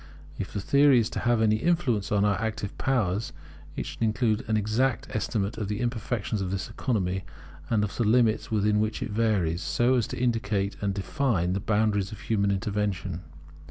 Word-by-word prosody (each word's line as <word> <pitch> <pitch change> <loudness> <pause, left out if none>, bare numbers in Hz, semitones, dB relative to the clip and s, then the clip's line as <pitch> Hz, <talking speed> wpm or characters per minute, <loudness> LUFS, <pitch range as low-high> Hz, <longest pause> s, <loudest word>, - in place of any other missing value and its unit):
If 95 - -4
the 105 - -3
theory 140 +4 +5
is 115 0 +1
to - - -3
have 120 -2 +2
any 110 0 +3
influence 125 - +1
upon 105 -1 +2
our 105 0 +1
active 110 -2 -3
powers, 110 -5 0 0.4
it - - -3
should - - -8
include 110 -1 +1
an 110 0 +2
exact 110 +4 0
estimate 110 0 -1
of 105 - -2
the 105 +1 -3
imperfections 115 -3 -2
of 95 - -2
this 95 -1 -3
economy 95 -7 -1 0.5
and 110 -3 +2
of 105 - -3
the 120 - +1
limits 110 0 +3
within 105 -1 +2
which 110 +1 -1
it - - -5
varies, 100 -6 +1
so 120 +4 +2
as 120 -4 +2
to - - -6
indicate 110 -5 0
and 100 -1 -1
define 100 - 0
the 95 - 0
boundaries 105 -1 +1
of 105 - -9
human 100 -3 +1
intervention. 100 -3 -2
105 Hz, 190 wpm, -27 LUFS, 100-115 Hz, 0.5 s, theory